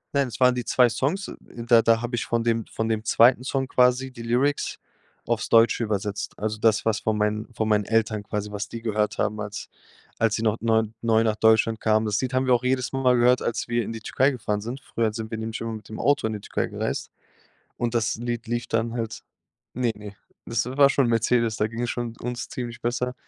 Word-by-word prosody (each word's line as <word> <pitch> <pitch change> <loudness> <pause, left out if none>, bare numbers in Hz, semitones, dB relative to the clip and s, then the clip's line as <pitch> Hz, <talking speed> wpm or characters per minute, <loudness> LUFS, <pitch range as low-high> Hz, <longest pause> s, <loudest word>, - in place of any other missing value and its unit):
Nein, 140 -1 +2
es 120 - -8
waren 125 -1 +5
die 125 0 -3
2 125 0 +4
Songs, 140 - -2
da 115 -1 +2
da 115 0 +3
habe 120 0 -2
ich 115 - -2
von 115 -1 0
dem 115 -2 0
von 110 0 -3
dem 110 -1 -1
2. 120 +3 +4
Song 135 0 -1
quasi 125 +1 +2
die 115 - -10
Lyrics 125 +5 0 0.5
auf's - - -1
Deutsche 115 +1 +4
übersetzt. 105 -1 -3
Also, 110 0 -3
das, 110 -1 +2
was 110 -2 +1
von 110 -1 -1
meinen 105 +2 -1
von 110 -2 -1
meinen 105 -1 +2
Eltern 110 -1 +1
quasi, 105 0 -4
was 105 0 -4
die 115 -1 -7
gehört 105 -2 0
haben, 105 0 -1
als 105 -1 -6 0.5
als 115 -1 +2
sie 115 - -3
noch 110 0 +1
neu 110 0 +3 0.2
neu 115 -1 +3
nach 110 -1 +1
Deutschland 110 0 +3
kamen. 110 0 +2
Das 105 -1 0
Lied 130 0 -3
haben 130 +1 +1
wir 130 - +4
auch 120 0 +2
jedes 130 0 0
Mal 130 -2 +3
gehört, 125 +1 +4
als 115 0 -2
wir 120 0 0
in 110 - -5
die 115 -1 -7
Türkei 130 +5 +2
gefahren 105 -6 -2
sind. 125 +5 -6
Früher 115 -2 -1
sind 110 0 -6
wir 110 - -3
nämlich 110 0 -4
immer 115 0 -3
mit 110 -2 -9
dem 110 - -7
Auto 145 -5 +2
in 110 - -3
die 105 - -5
Türkei - - -2
gereist - - -3 0.7
und 120 -1 -2
das 115 -1 +1
Lied 120 0 -4
lief 120 +1 -2
dann 115 +1 -1
halt 115 -2 -4 0.5
ne, 120 -1 0
ne. 105 -1 -10 0.3
Das 115 -2 -1
war 140 +2 +4
schon 140 -2 +2
'n - - 0
Mercedes, 115 0 +1
da 105 - +1
ging 115 +2 -6
es 120 - -2
schon 120 -2 -4
uns 125 +1 -4
ziemlich 120 -2 -6
besser. 125 +1 -1
115 Hz, 235 wpm, -25 LUFS, 110-125 Hz, 0.7 s, waren